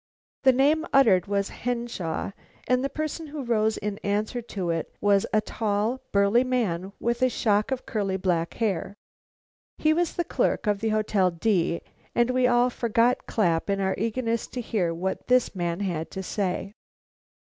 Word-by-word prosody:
The 265 Hz, -, +6 dB
name 285 Hz, +5 st, +3 dB
uttered 220 Hz, -10 st, +5 dB
was 200 Hz, 0 st, 0 dB
Henshaw, 235 Hz, -9 st, -3 dB, 0.4 s
and 250 Hz, +1 st, +2 dB
the 275 Hz, -, 0 dB
person 310 Hz, +2 st, -4 dB
who 290 Hz, -1 st, -6 dB
rose 220 Hz, -2 st, +1 dB
in 205 Hz, 0 st, -4 dB
answer 210 Hz, +4 st, -1 dB
to 190 Hz, -6 st, -3 dB
it 165 Hz, -1 st, -3 dB
was 200 Hz, -1 st, +3 dB
a 215 Hz, -, +3 dB
tall, 215 Hz, +3 st, -1 dB
burly 200 Hz, +5 st, +4 dB
man 200 Hz, -8 st, -1 dB
with 235 Hz, +1 st, -1 dB
a 255 Hz, -, +4 dB
shock 215 Hz, -1 st, +1 dB
of 265 Hz, -1 st, -3 dB
curly 200 Hz, -5 st, -1 dB
black 175 Hz, -3 st, -1 dB
hair. 200 Hz, -3 st, -1 dB, 0.8 s
He 310 Hz, 0 st, +3 dB
was 345 Hz, 0 st, 0 dB
the 345 Hz, -, 0 dB
clerk 340 Hz, -, 0 dB
of 205 Hz, -1 st, +1 dB
the 220 Hz, +1 st, 0 dB
Hotel 215 Hz, -3 st, +2 dB
D, 170 Hz, -1 st, 0 dB, 0.3 s
and 240 Hz, +1 st, +3 dB
we 255 Hz, 0 st, +3 dB
all 245 Hz, 0 st, +3 dB
forgot 235 Hz, +1 st, +1 dB
Clapp 175 Hz, -5 st, +1 dB
in 195 Hz, 0 st, +1 dB
our 190 Hz, -1 st, +1 dB
eagerness 230 Hz, +2 st, -1 dB
to 250 Hz, -, -6 dB
hear 210 Hz, -7 st, 0 dB
what 185 Hz, +3 st, -3 dB
this 250 Hz, 0 st, +3 dB
man 175 Hz, -1 st, -2 dB
had 170 Hz, -5 st, -2 dB
to 190 Hz, -, -6 dB
say. 195 Hz, +1 st, -2 dB
215 Hz, 170 wpm, -26 LUFS, 190-245 Hz, 0.8 s, The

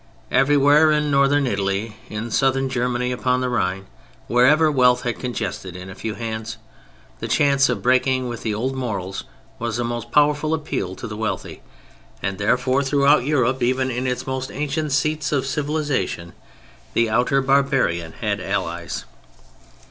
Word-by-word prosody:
Everywhere 145 Hz, +3 st, +5 dB
in 150 Hz, -1 st, +1 dB
Northern 140 Hz, +1 st, +3 dB
Italy, 100 Hz, -1 st, -1 dB
in 110 Hz, +2 st, -5 dB
Southern 135 Hz, +1 st, +2 dB
Germany, 125 Hz, -1 st, -1 dB
upon 125 Hz, 0 st, 0 dB
the 130 Hz, -, 0 dB
Rhine, 95 Hz, -5 st, -1 dB, 0.4 s
wherever 150 Hz, +6 st, +4 dB
wealth 125 Hz, -3 st, +3 dB
had 120 Hz, -2 st, -2 dB
congested 105 Hz, -7 st, -4 dB
in 90 Hz, +1 st, -8 dB
a -, -, -7 dB
few 110 Hz, +2 st, -5 dB
hands, 110 Hz, +1 st, -5 dB, 0.6 s
the -, -, -4 dB
chance 140 Hz, -2 st, +3 dB
of 110 Hz, -6 st, -2 dB
breaking 130 Hz, 0 st, +2 dB
with 120 Hz, -2 st, -5 dB
the 110 Hz, -, -2 dB
old 120 Hz, +6 st, -2 dB
morals 100 Hz, -7 st, -4 dB, 0.3 s
was 115 Hz, -1 st, -2 dB
a 120 Hz, 0 st, -2 dB
powerful 150 Hz, +2 st, +3 dB
appeal 100 Hz, -, -4 dB
to -, -, -8 dB
the 105 Hz, -2 st, -6 dB
wealthy; 105 Hz, -3 st, -4 dB, 0.6 s
and, 95 Hz, 0 st, -3 dB
therefore, 125 Hz, +6 st, +2 dB
throughout 140 Hz, -1 st, +3 dB
Europe, 130 Hz, -3 st, +1 dB
even 130 Hz, +2 st, +1 dB
in 125 Hz, +2 st, -2 dB
its 125 Hz, 0 st, -2 dB
most 130 Hz, 0 st, -3 dB
ancient 150 Hz, +1 st, -2 dB
seats 155 Hz, +2 st, 0 dB
of 140 Hz, -3 st, +1 dB
civilization, 140 Hz, -, -2 dB, 0.6 s
the 115 Hz, -, +3 dB
outer 125 Hz, +5 st, +2 dB
barbarian 135 Hz, -, +1 dB
had -, -, -2 dB
allies. -, -, -3 dB
125 Hz, 150 wpm, -22 LUFS, 110-140 Hz, 0.6 s, Everywhere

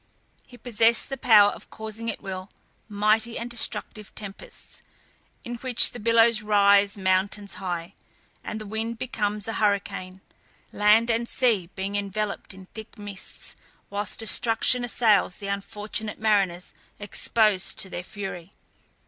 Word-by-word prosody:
He 245 Hz, -, -14 dB
possessed 230 Hz, 0 st, +3 dB
the 270 Hz, -, -3 dB
power 210 Hz, -5 st, +6 dB
of -, -, -12 dB
causing 220 Hz, +1 st, -6 dB
at 215 Hz, -, -6 dB
will, 190 Hz, 0 st, -6 dB, 0.4 s
mighty 215 Hz, +3 st, +1 dB
and 240 Hz, +1 st, -5 dB
destructive 215 Hz, -2 st, -1 dB
tempests, 200 Hz, -1 st, -7 dB, 0.6 s
in 240 Hz, -3 st, -6 dB
which 250 Hz, 0 st, +5 dB
the 245 Hz, -, -9 dB
billows 230 Hz, 0 st, +4 dB
rise 200 Hz, -1 st, +4 dB
mountains 195 Hz, +2 st, 0 dB
high, 175 Hz, -1 st, -4 dB, 0.5 s
the 215 Hz, 0 st, -6 dB
wind 220 Hz, +2 st, -3 dB
becomes 210 Hz, -4 st, -2 dB
a 225 Hz, -, -3 dB
hurricane, 195 Hz, -3 st, -1 dB, 0.5 s
land 215 Hz, +3 st, +4 dB
and 230 Hz, +1 st, -1 dB
sea 220 Hz, -9 st, +1 dB
being 195 Hz, +1 st, -3 dB
enveloped 205 Hz, +1 st, -3 dB
in 190 Hz, 0 st, -12 dB
thick 220 Hz, +1 st, -10 dB
mists, 205 Hz, -2 st, -4 dB, 0.4 s
whilst 200 Hz, 0 st, -3 dB
destruction 225 Hz, +2 st, +3 dB
assails 220 Hz, -6 st, +2 dB
the 200 Hz, -, -9 dB
unfortunate 210 Hz, +2 st, -3 dB
mariners 195 Hz, -5 st, 0 dB, 0.2 s
exposed 205 Hz, -1 st, +1 dB
to -, -, +2 dB
their 180 Hz, -, -5 dB
fury. 190 Hz, -2 st, -7 dB
210 Hz, 130 wpm, -25 LUFS, 200-225 Hz, 0.6 s, power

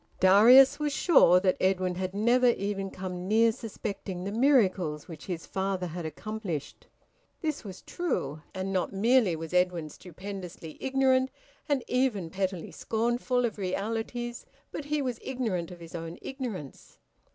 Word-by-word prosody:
Darius 250 Hz, +9 st, +7 dB
was 300 Hz, -1 st, 0 dB
sure 180 Hz, -, +6 dB
that 185 Hz, -1 st, +2 dB
Edwin 185 Hz, -1 st, +1 dB
had 185 Hz, +1 st, -4 dB
never 240 Hz, +4 st, +4 dB
even 200 Hz, -4 st, 0 dB
come 185 Hz, -1 st, -6 dB
near 225 Hz, +2 st, +4 dB
suspecting 200 Hz, -5 st, -6 dB
the 200 Hz, -, -3 dB
miracles 205 Hz, -, +2 dB
which 160 Hz, -3 st, -10 dB
his 175 Hz, -3 st, -4 dB
father 190 Hz, -1 st, -2 dB
had 170 Hz, -1 st, -5 dB
accomplished: 200 Hz, -, -6 dB, 0.5 s
this 310 Hz, -3 st, -2 dB
was 190 Hz, -3 st, -9 dB
true, 155 Hz, -, -3 dB
and 190 Hz, +1 st, -3 dB
not 185 Hz, -, 0 dB
merely 215 Hz, -2 st, +3 dB
was 160 Hz, +1 st, -7 dB
Edwin 180 Hz, -3 st, +1 dB
stupendously 180 Hz, -1 st, -9 dB
ignorant, 265 Hz, -1 st, +2 dB, 0.4 s
and 280 Hz, -4 st, +1 dB
even 235 Hz, -10 st, 0 dB
pettily 190 Hz, -3 st, -3 dB
scornful, 240 Hz, +2 st, 0 dB
of 220 Hz, -2 st, -4 dB
realities, 225 Hz, +5 st, -3 dB, 0.2 s
but 300 Hz, -, -5 dB
he 295 Hz, 0 st, -1 dB
was 250 Hz, -3 st, -3 dB
ignorant 220 Hz, -10 st, -2 dB
of 180 Hz, -1 st, -10 dB
his 165 Hz, -1 st, -11 dB
own 165 Hz, 0 st, -6 dB
ignorance. 230 Hz, -, -7 dB
195 Hz, 145 wpm, -28 LUFS, 180-245 Hz, 0.5 s, Darius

